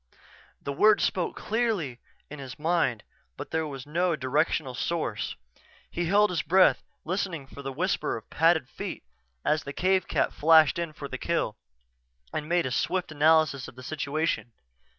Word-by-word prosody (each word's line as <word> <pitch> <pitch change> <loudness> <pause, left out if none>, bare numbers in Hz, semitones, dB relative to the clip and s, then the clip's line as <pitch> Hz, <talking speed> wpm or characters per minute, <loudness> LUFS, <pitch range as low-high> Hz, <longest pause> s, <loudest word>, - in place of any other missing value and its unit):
_" - - -32
The 140 - -3
words 210 +8 +5
spoke 185 -4 0
clearly 210 - -1 0.3
in 150 - -9
his 130 -2 -8
mind 160 -8 +1 0.3
but - - -7
there 160 -1 0
was 135 -2 -7
no 170 +3 +1
directional 145 0 0
source. 140 -5 -2 0.6
He 175 - -2
held 205 +4 +4
his 170 -4 0
breath, 185 +6 +4 0.2
listening 175 -4 -2
for 140 +1 -11
the 135 0 -4
whisper 180 +2 -1
of 110 - -12
padded 160 -3 +3
feet - - -6 0.4
as 155 0 +2
the 140 - -6
cave 185 +3 +1
cat - - 0
flashed 160 0 +5
in 170 -2 -2
for 145 -2 -7
the 130 -1 -6
kill, 165 -11 -1 0.8
and 155 0 -3
made 175 0 +2
a 130 - -2
swift 180 +7 -1
analysis 155 -2 +3
of - - -12
the 130 - -11
situation. 145 -2 -2
155 Hz, 170 wpm, -27 LUFS, 140-175 Hz, 0.8 s, words